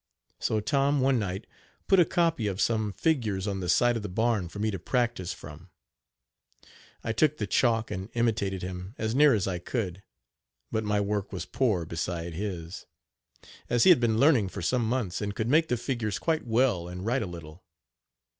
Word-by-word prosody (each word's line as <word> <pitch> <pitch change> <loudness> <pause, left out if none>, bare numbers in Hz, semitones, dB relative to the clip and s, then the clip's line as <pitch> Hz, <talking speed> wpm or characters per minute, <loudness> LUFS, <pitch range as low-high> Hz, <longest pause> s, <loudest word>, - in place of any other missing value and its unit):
So 110 - 0
Tom 140 +6 +1
one 130 -1 +3
night 95 0 -3 0.4
put 195 - +5
a 175 - +6
copy 165 - +1
of 95 -1 -3
some 110 -2 +1
figures 110 - 0
on 100 -2 -2
the 90 -2 -3
side 120 +7 +4
of 115 - -2
the 105 - -5
barn 110 -2 0
for 100 - -10
me 110 +1 0
to 95 - -4
practice 120 -3 -1
from. 80 +5 -10 1.3
I 115 - -1
took 150 +6 +2
the 105 - -2
chalk 115 +1 +1
and 95 +1 -5
imitated 105 -6 0
him 90 +3 -6
as 110 0 -2
near 145 -1 +6
as 100 -3 -1
I 90 -2 -2
could, 95 -1 -3 0.7
but 110 -1 -1
my 105 0 +1
work 100 0 -2
was 95 - -4
poor 105 -11 0
beside 85 +1 -4
his, 90 -2 -5 0.8
as 120 -1 +3
he 190 - +8
had 170 - +6
been 115 -2 +1
learning 125 -7 +4
for 95 -1 -6
some 120 +3 +1
months, 115 -8 -1
and 100 0 -3
could 110 - -2
make 160 +4 +4
the 125 - 0
figures 115 -4 -2
quite 160 -6 -1
well 110 -7 +2
and 90 +2 -7
write 125 +4 +1
a - - -3
little. 85 0 -10
110 Hz, 190 wpm, -28 LUFS, 95-120 Hz, 1.3 s, he